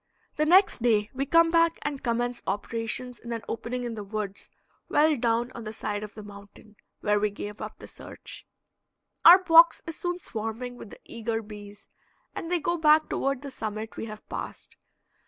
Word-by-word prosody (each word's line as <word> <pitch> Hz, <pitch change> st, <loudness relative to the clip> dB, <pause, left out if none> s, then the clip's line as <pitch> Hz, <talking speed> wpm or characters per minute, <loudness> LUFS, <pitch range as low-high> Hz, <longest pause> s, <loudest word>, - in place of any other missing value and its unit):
The 305 Hz, -, +1 dB
next 375 Hz, -, +5 dB
day 215 Hz, -3 st, +2 dB
we 275 Hz, +2 st, -2 dB
come 330 Hz, +2 st, +5 dB
back 335 Hz, 0 st, +3 dB
and 285 Hz, -2 st, -4 dB
commence 240 Hz, 0 st, -1 dB
operations 225 Hz, +4 st, -2 dB
in 235 Hz, -, -9 dB
an 230 Hz, -, -5 dB
opening 245 Hz, +2 st, -4 dB
in 240 Hz, -1 st, -4 dB
the 210 Hz, -2 st, -6 dB
woods 205 Hz, -1 st, -5 dB, 0.4 s
well 305 Hz, +1 st, +4 dB
down 235 Hz, 0 st, 0 dB
on 235 Hz, -, -8 dB
the 215 Hz, -, -5 dB
side 205 Hz, -1 st, -4 dB
of 210 Hz, 0 st, -8 dB
the 215 Hz, -, -9 dB
mountain, 205 Hz, +1 st, -14 dB, 0.3 s
where 210 Hz, 0 st, +2 dB
we 210 Hz, +1 st, +1 dB
gave 205 Hz, +1 st, -8 dB
up -, -, -7 dB
the -, -, -11 dB
search. -, -, -11 dB, 0.8 s
Our 345 Hz, +2 st, +11 dB
box 335 Hz, -1 st, +6 dB
is 325 Hz, -, -6 dB
soon 350 Hz, 0 st, -2 dB
swarming 225 Hz, -1 st, -5 dB
with 230 Hz, -, -11 dB
the -, -, -13 dB
eager 225 Hz, -1 st, -3 dB
bees, 205 Hz, -1 st, -12 dB, 0.5 s
and 330 Hz, -, -6 dB
they 355 Hz, -, +2 dB
go 340 Hz, +2 st, -1 dB
back 310 Hz, -1 st, +4 dB
toward 275 Hz, 0 st, -1 dB
the 280 Hz, -, -7 dB
summit 215 Hz, -2 st, -5 dB
we -, -, -5 dB
have 215 Hz, -1 st, -10 dB
passed. -, -, -7 dB
235 Hz, 190 wpm, -27 LUFS, 215-295 Hz, 0.8 s, Our